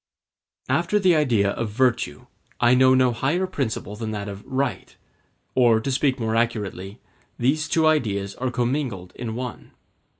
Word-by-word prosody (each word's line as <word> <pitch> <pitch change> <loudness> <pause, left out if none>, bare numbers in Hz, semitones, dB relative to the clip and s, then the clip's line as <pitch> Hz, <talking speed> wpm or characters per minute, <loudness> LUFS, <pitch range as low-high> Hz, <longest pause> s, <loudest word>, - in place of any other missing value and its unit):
After 210 - +1
the 185 -4 +4
idea 115 -10 +2
of 115 +1 -3
virtue, 120 +2 0 0.3
I 120 0 +5
know 130 0 +5
no 130 -1 +4
higher 145 +10 0
principle 120 - -3
than 110 0 -5
that 105 -1 -4
of 100 0 -7
right; 135 +1 -3 0.6
or, 120 -3 +4
to 135 +5 -3
speak 130 0 +1
more 110 -1 -1
accurately, 105 -3 -2 0.4
these 150 +6 +1
two 160 -1 +2
ideas 105 -11 +1
are 130 0 -1
commingled 120 -6 -2
in 115 -2 -5
one. 125 -3 -7
120 Hz, 155 wpm, -23 LUFS, 110-135 Hz, 0.6 s, I